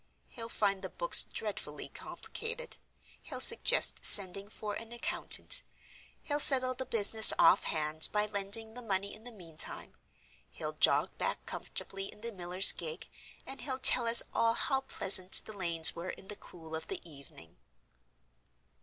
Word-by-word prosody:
He'll 230 -2 -9
find 200 -4 -3
the - - -8
books - - +4
dreadfully - - -7
complicated; 475 +2 -9 0.4
he'll - - -9
suggest 465 - +3
sending 195 0 +2
for 210 -1 -9
an 230 +2 -10
accountant; 345 - -1 0.6
he'll 290 0 -4
settle 255 -3 +6
the 260 +1 -8
business 220 0 +6
off 190 - +2
hand, 155 0 -1
by 210 0 -1
lending 210 +2 -5
the 245 - -11
money 200 -3 -5
in 220 +2 -16
the 245 - -11
meantime; 170 -7 -3 0.6
he'll - - -8
jog - - -1
back - - -4
comfortably 195 0 -8
in 210 - -20
the 235 +1 -7
miller's 180 -1 +3
gig; 160 0 -8 0.4
and 270 - -9
he'll 260 -2 -5
tell 255 -2 +5
us 230 +1 +8
all 230 0 -1
how 270 -1 -3
pleasant 190 -7 -1
the 215 - -12
lanes 170 -5 +3
were 170 +2 -9
in 190 - -12
the 210 - -7
cool 160 -5 -13
of 160 0 -9
the - - -8
evening." 140 - -15
210 Hz, 155 wpm, -29 LUFS, 180-240 Hz, 0.6 s, us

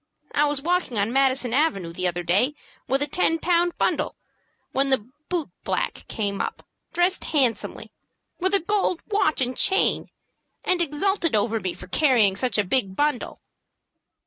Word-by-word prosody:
I 295 - +3
was 290 -2 -2
walking 345 -8 0
on 205 +3 0
Madison 260 -3 +2
Avenue 200 - +1
the 185 +1 -1
other 175 0 -2
day 200 - +2 0.3
with 270 +3 +1
a - - -2
ten 325 +2 +2
pound 345 +1 +1
bundle, - - 0 0.6
when 270 +1 +1
the 255 -5 +1 0.2
boot 345 -5 -2
black - - -2
came 200 -2 -2
up, - - -5 0.3
dressed 350 +2 +1
handsomely, 255 -8 -1 0.5
with 375 +2 +1
a - - +4
gold 385 -1 0
watch 355 -9 +2
and 250 0 0
chain, 385 +8 +2 0.5
and 365 -1 +2
exulted 335 - 0
over 220 +2 +1
me 185 -3 -3
for - - -9
carrying 240 -10 +3
such 245 +4 -1
a 210 - +3
big 195 -2 0
bundle." 290 -1 -1
275 Hz, 160 wpm, -24 LUFS, 220-340 Hz, 0.6 s, a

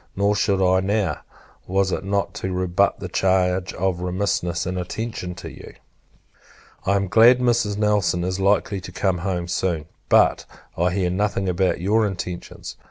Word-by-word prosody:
Nor 100 +1 +2
should 100 -1 +1
I 95 0 +3
now, 95 -3 0 0.5
was 95 0 +1
it - - -2
not 100 0 -1
to 95 - -2
rebut 90 +2 +1
the - - -5
charge 95 -1 +1
of 90 -2 -1
remissness 90 -2 -1
and 90 0 -3
inattention 90 -1 -5
to - - -8
you. - - -12 1.1
I 100 - +3
am 100 0 0
glad 115 +6 +6
Mrs. 120 -4 +1
Nelson 105 -5 +1
is 95 +1 -2
likely 100 0 +1
to 90 - -9
come 95 0 0
home 90 -1 -2
soon; 85 -3 -1 0.2
but, - - +4 0.3
I 90 +2 +1
hear 90 0 0
nothing 100 0 -1
about 90 -1 0
your 105 +4 +2
intentions. 90 -2 -7
95 Hz, 165 wpm, -22 LUFS, 90-100 Hz, 1.1 s, glad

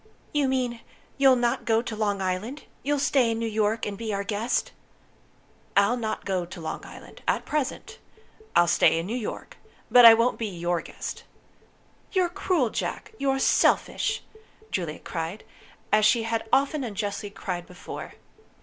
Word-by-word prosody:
"You 290 -2 +2
mean, 250 -3 -1 0.4
you'll 270 -2 +7
not 240 -1 0
go 225 0 +2
to 230 - -5
Long 205 -2 -1
Island? 200 +10 -3 0.2
You'll 290 +1 0
stay 270 -3 +3
in 225 - -1
New 230 - -2
York, 220 0 0
and 200 -1 -5
be 225 -2 -3
our 200 0 -1
guest?" 225 +3 -1 1.1
"I'll 200 +4 +5
not 225 -3 -3
go 185 -2 0
to 175 0 -9
Long 160 - -5
Island - - -12
at - - +1
present. 300 -4 -3 0.6
I'll 175 - +6
stay 165 - +4
in 165 - -2
New 220 +6 -3
York. 240 -4 -6 0.3
But 245 -1 +9
I 225 -1 +11
won't 230 +2 +1
be 225 - -1
your 175 -2 -1
guest." - - -7 0.9
"You're 365 -3 +2
cruel, 335 - 0
Jack! - - -4
You're 270 -1 +1
selfish!" 270 - +2 0.5
Juliet 170 -5 -3
cried, 165 +4 -4 0.5
as 215 0 +4
she 225 +2 +4
had 225 0 -2
often 280 +1 +2
unjustly 205 -2 -3
cried 180 -3 -5
before. 180 - -8
225 Hz, 160 wpm, -26 LUFS, 200-250 Hz, 1.1 s, I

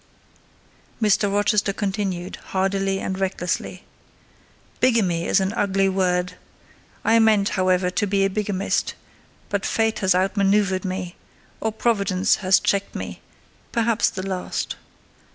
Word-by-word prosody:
Mr. 210 -2 +2
Rochester 205 0 +2
continued, 195 -3 -3
hardily 195 0 -1
and 190 0 -3
recklessly: 185 -2 -2 1.0
"Bigamy 195 -10 +2
is - - +3
an 190 +2 -1
ugly 195 -3 +1
word!—I 185 +4 -2
meant, 215 -3 +4
however, 185 -1 +1
to 205 +3 0
be 195 0 +2
a - - +1
bigamist; 200 -1 -1 0.5
but 200 -1 -1
fate 225 0 0
has 190 -2 +3
out 190 +3 +1
manoeuvred 195 -1 +2
me, 185 -1 -4 0.4
or 220 - -1
Providence 200 -4 +1
has 190 -1 +4
checked 200 0 -1
me,—perhaps 230 -1 -3
the 190 0 -6
last. 185 -1 -3
195 Hz, 115 wpm, -23 LUFS, 185-205 Hz, 1.0 s, meant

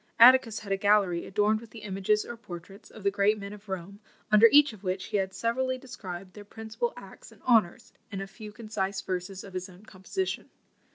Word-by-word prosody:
Atticus 240 -2 +7
had 200 -2 -7
a 195 - +2
gallery 195 -4 +2
adorned 210 +2 +2
with 230 - -13
the 220 0 -11
images 200 +1 0
or 235 - -6
portraits 195 -2 -11
of 215 - -13
the 200 - +3
great 205 +2 +3
men 200 0 -7
of 210 0 -13
Rome, 190 +2 -5 0.3
under 215 +2 +9
each 290 -3 +6
of 205 -2 -14
which 190 0 -2
he 210 - -1
had 190 -1 -1
severally 255 +5 -1
described 190 -8 -8
their 205 - -10
principal 220 - -4
acts - - -12
and - - -20
honours, 225 -8 +2 0.2
in 195 - -4
a 195 - -4
few 210 +2 -10
concise 205 -3 -3
verses 185 0 -4
of 195 - -11
his 185 0 -4
own 185 +3 -16
composition. 215 - -4
205 Hz, 210 wpm, -28 LUFS, 190-220 Hz, 0.3 s, under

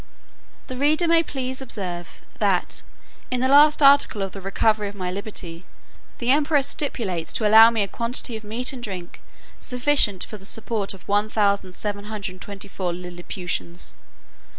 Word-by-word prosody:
The 255 - -7
reader 310 +5 +2
may 330 0 +5
please 260 -4 -4
to - - -5
observe, 175 -7 -5 0.2
that, - - 0 0.5
in 250 - -1
the 260 - +2
last 295 +2 +6
article 275 -7 +5
of 195 - -4
the 195 - -9
recovery 210 +2 +1
of 205 - -12
my 180 -2 -4
liberty, 185 -4 -7 0.5
the 240 +1 +1
emperor 290 0 +3
stipulates 210 - -1
to 215 - +1
allow 220 +2 +9
me 225 -3 0
a - - -3
quantity 235 +2 -3
of 220 - -7
meat 230 +5 -2
and 255 - -8
drink 185 -6 -7 0.4
sufficient 250 -7 +3
for 215 - -8
the - - -16
support 210 -1 -2
of 190 - -18
1724 200 -2 -2
Lilliputians. 175 0 -6
210 Hz, 150 wpm, -23 LUFS, 190-255 Hz, 0.5 s, allow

